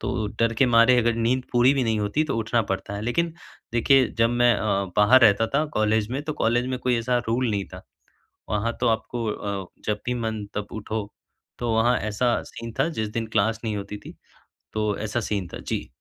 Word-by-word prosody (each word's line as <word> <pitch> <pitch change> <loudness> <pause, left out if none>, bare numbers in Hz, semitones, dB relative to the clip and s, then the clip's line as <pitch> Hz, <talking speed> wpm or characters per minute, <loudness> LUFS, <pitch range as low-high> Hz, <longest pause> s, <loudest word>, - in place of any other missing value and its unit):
तो 110 -3 -2
डर 115 0 +3
के 135 - +5
मारे 120 +1 +5
अगर 120 0 +2
नींद 120 +3 +1
पूरी 125 +2 +5
भी 130 -3 +1
नहीं 110 -1 +1
होती 105 +10 0
तो 140 - -2
उठना 115 +1 +1
पड़ता 95 +1 -3
है - - -5
लेकिन 160 +9 0 0.4
देखिए 130 +2 +4
जब 115 +1 +4
मैं 120 0 +4
अ, 100 -1 0
बाहर 110 +5 +6
रहता 110 +1 +5
था 150 - +3
कॉलेज 110 0 +1
में 140 +2 -2
तो 155 - -2
कॉलेज 120 +2 +2
में 130 -1 -2
कोई 125 -1 +1
ऐसा 120 +1 +1
रूल 120 +1 +1
नहीं 100 -2 -1
था। - - -10 0.7
वहाँ 110 +3 -1
तो - - +2
आपको 115 +1 -1
अ, 100 -3 -4 0.2
जब 105 0 -1
भी 125 - 0
मन 110 -3 -3
तब 105 0 -3
उठो, 110 -1 -4 0.5
तो 120 -2 -1
वहाँ 120 +2 +3
ऐसा 110 +4 0
सीन 115 -1 -7
था 145 - +3
जिस 110 - -1
दिन 115 - -2
क्लास 110 +1 +1
नहीं 110 -2 -2
होती 100 +1 -5
थी, - - -12 0.6
तो 105 -2 -1
ऐसा 110 +2 -2
सीन 95 -4 -1
था। - - -6
जी। - - -2
115 Hz, 215 wpm, -24 LUFS, 105-120 Hz, 0.7 s, बाहर